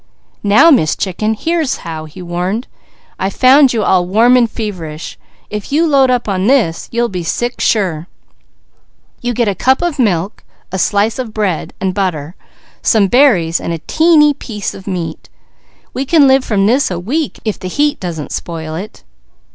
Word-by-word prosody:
"Now 220 +11 +5
Miss 160 - +3
Chicken, 215 +3 -2
here's 325 +3 -1
how!" 160 -2 -6
he 170 +4 -11
warned. 180 +7 -3 0.5
"I 190 - 0
found 260 +5 +5
you 225 -3 -1
all 185 -2 +3
warm 230 +6 +4
and 240 -2 +3
feverish. 170 -9 -6 0.4
If 210 +2 -6
you 315 +4 +2
load 275 -4 +3
up 245 -2 0
with 190 -1 -1
this, 230 -12 +1
you'll 235 0 0
be 185 -5 -5
sick 240 +8 -3
sure. 180 -7 0 1.1
You 245 -1 -2
get 235 -1 +1
a 200 - +1
cup 260 - +1
of 335 -5 -2
milk, 200 -4 0 0.3
a 190 - -3
slice 205 +5 +1
of 230 -4 -5
bread 200 -7 -2
and 190 -1 -1
butter, 175 -5 -2 0.5
some 210 -4 +3
berries 200 - +3
and 170 - -3
a - - -2
teeny 315 -2 +4
piece 220 -7 -6
of 190 - -12
meat. 170 -4 -5 0.6
We 265 - -2
can 300 -2 +5
live 265 0 +4
from 200 -5 0
this 255 +7 +2
a 180 - -3
week, 280 - -2
if 215 - -2
the 185 - -6
heat 295 +9 0
doesn't 165 -5 -5
spoil 160 -2 -5
it." 190 +6 -8
210 Hz, 175 wpm, -15 LUFS, 180-255 Hz, 1.1 s, Now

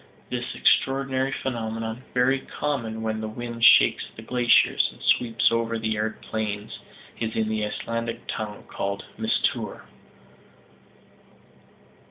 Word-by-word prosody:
This - - -3
extraordinary 135 0 +2
phenomenon, 115 -3 -3
very 130 +2 +3
common 115 -6 -3
when 110 0 -2
the 110 - -3
wind 115 +1 -6
shakes 125 - +6
the 110 - -10
glaciers, 120 0 +4
and - - -17
sweeps 115 -2 +3
over 115 0 0
the 110 0 -1
arid 110 +1 -3
plains, 105 -1 -4 0.4
is 115 -1 -2
in 110 -1 +1
the 110 -1 -1
Icelandic 115 +2 -3
tongue 105 -1 -5
called 100 0 -4
"mistour." - - 0
115 Hz, 120 wpm, -25 LUFS, 110-125 Hz, 0.4 s, shakes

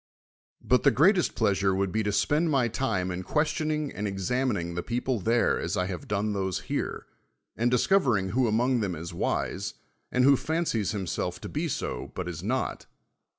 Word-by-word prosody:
But 125 - +3
the - - +6
great*'st 180 +6 +3
i)!' 115 - +3
asure 95 -1 +1
would 95 -1 0
be 110 - 0
to 105 -1 0
spend 150 +10 +2
86 - - 0
SOCRATES - - 0
my 130 -3 +3
time 100 -7 -1
in 90 +1 -4
questionijic: 150 - 0
and 105 - -3
oxaniininti' 100 -2 -1
the 85 - -2
peo 120 +6 -2
ple 130 -4 -1
there 115 +5 +2
as - - -2
I 90 - +1
have 90 -4 -6
done 105 +1 0
those 95 -2 -2
here, - - -3 0.5
and 120 +2 +1
discov 190 +10 +3
ering 100 -7 +1
who 125 +1 +2
among 120 +3 +2
them 100 -5 -1
is 85 +1 -7
wise, 95 +1 -2 0.4
and 125 - +2
who 140 +1 +7
fancies 155 - -1
himself 90 -2 -3
to - - -6
be 155 +3 -2
so 150 - -4
but 90 -1 -4
is 85 -2 -5
not. 125 +7 -2
110 Hz, 200 wpm, -27 LUFS, 95-130 Hz, 0.5 s, who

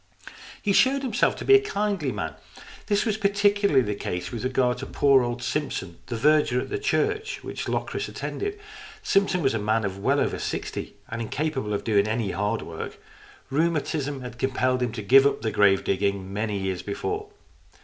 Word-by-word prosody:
He 200 - 0
showed 270 +6 +4
himself 245 -5 +1
to - - -7
be 405 - +6
a 405 - +8
kindly 205 - -1
man. 80 -8 -4 0.5
This 205 0 +2
was 215 -2 0
particularly 200 -7 +3
the 105 - -2
case 90 -3 -4
with 115 -3 -5
regard 130 -1 +1
to - - -6
poor 140 -2 +4
old 120 0 -3
Simpson, 95 - -3
the 120 - -3
verger 150 -1 +3
at - - -4
the 415 - -2
church 425 +1 -1
which - - -5
Locris - - -2
attended. 410 0 -4 0.4
Simpson 195 -3 +2
was 135 - +2
a 115 - 0
man 110 +1 +1
of 95 0 -4
well - - +2
over - - 0
sixty, - - -4
and 115 +1 -4
incapable 130 -1 -2
of 100 - -1
doing 105 -2 +2
any 110 -2 -1
hard 105 +4 -1
work. 80 -1 -7 0.5
Rheuma 160 +2 +2
tism 145 -3 -3
had 120 -1 -8
compelled 130 -1 +1
him 125 -2 0
to 110 -3 -5
give 135 +6 +7
up 140 - -2
the 110 - 0
grave 100 -1 +4
digging 100 0 -1
many 105 0 -1
years 95 -2 -2
before. 415 - -4
130 Hz, 190 wpm, -25 LUFS, -, 0.5 s, a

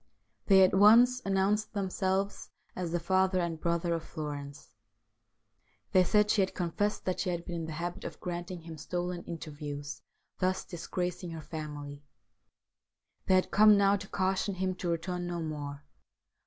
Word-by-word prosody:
They 190 -1 +7
at 185 - +4
once 235 +6 +6
announced 200 +3 +1
themselves 195 0 -1 0.3
as 180 -2 -3
the 175 - 0
father 185 +2 +2
and 165 -3 -2
brother 170 0 0
of 165 -1 -2
Florence. 145 -2 -7 1.2
They 185 - +6
said 210 +3 +3
she 210 - +3
had 190 - -1
confessed 200 +4 -1
that 185 - -1
she 185 - 0
had 170 -1 -3
been 175 - -4
in 165 - -3
the 160 - -5
habit 175 +3 -4
of - - -7
granting 175 0 -5
him 165 -2 -9
stolen 175 +2 -3
interviews, 145 -3 -6 0.4
thus 185 0 0
disgracing 180 +1 -4
her 165 -1 -6
family. 150 -2 -7 1.2
They 190 - +5
had 185 - +2
come 210 0 +7
now 200 0 +4
to 200 0 -6
caution 190 +1 0
him 185 0 -1
to 175 - -3
return 175 +1 -2
no 175 -1 -3
more. 145 -3 -5
180 Hz, 160 wpm, -30 LUFS, 165-190 Hz, 1.2 s, They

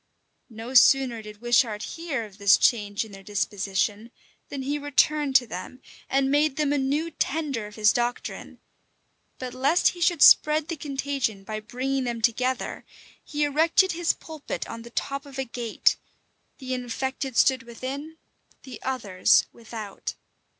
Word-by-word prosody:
No 225 +2 -8
sooner 255 -2 +5
did 210 0 -12
Wishart 240 -3 +2
hear 310 -9 -4
of 205 -1 -16
this 200 -1 +6
change 205 -2 +1
in 220 - -14
their 195 -1 -11
disposition, 205 +2 -2 0.4
than 275 -2 -5
he 290 +2 -2
returned 290 0 +1
to 245 -1 +6
them, 220 +4 -8 0.3
and 270 0 +2
made 290 -1 +2
them 290 -1 +1
a 290 - +1
new 290 +5 -1
tender 280 -8 -2
of 210 - -13
his 215 -1 +4
doctrine: 240 0 -3 0.8
but 255 -1 -6
lest 280 +7 +3
he 350 - -9
should 340 -3 +3
spread 305 +1 +6
the 335 - -2
contagion 275 -7 -3
by 215 +2 -5
bringing 255 +4 -2
them 240 -1 -3
together, 250 +3 -1 0.4
he 295 -1 -2
erected 325 +6 +3
his 340 0 +1
pulpit 315 -3 -7
on 230 - -7
the 235 - -11
top 275 +3 -3
of 275 -1 -11
a 270 - -2
gate; 235 -2 0 0.6
the 260 -2 -5
infected 255 +1 -3
stood 260 -3 +4
within, 265 +7 -7 0.5
the 250 -4 -10
others 215 -9 +2
without. 220 -3 -7
255 Hz, 155 wpm, -25 LUFS, 225-285 Hz, 0.8 s, this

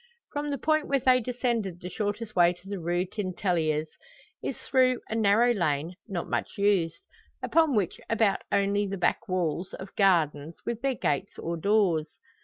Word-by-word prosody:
From 290 0 -2
the 280 - -1
point 310 +3 +1
where 275 - +2
they 255 0 +4
descended 235 -6 -2
the 180 - -7
shortest 215 +1 -3
way 175 0 +5
to 180 +2 -18
the 200 -1 -4
Rue 175 +2 0
Tintelleries 175 -6 -1 0.5
is - - -3
through 255 -2 +2
a - - -3
narrow 225 +2 +4
lane 160 -4 -1
not 185 -5 -3
much - - -3
used, 185 -5 +1 0.4
upon 320 -5 +3
which 195 -5 -1
abut 220 -3 +2
only 200 +1 +2
the 195 0 -4
back 210 +5 0
walls 180 -1 -1
of 190 +1 -10
gardens, 160 -5 +2
with 235 -1 -3
their 270 -1 0
gates 185 -1 -1
or 170 +1 -3
doors. 175 -4 +2
200 Hz, 170 wpm, -28 LUFS, 175-230 Hz, 0.5 s, way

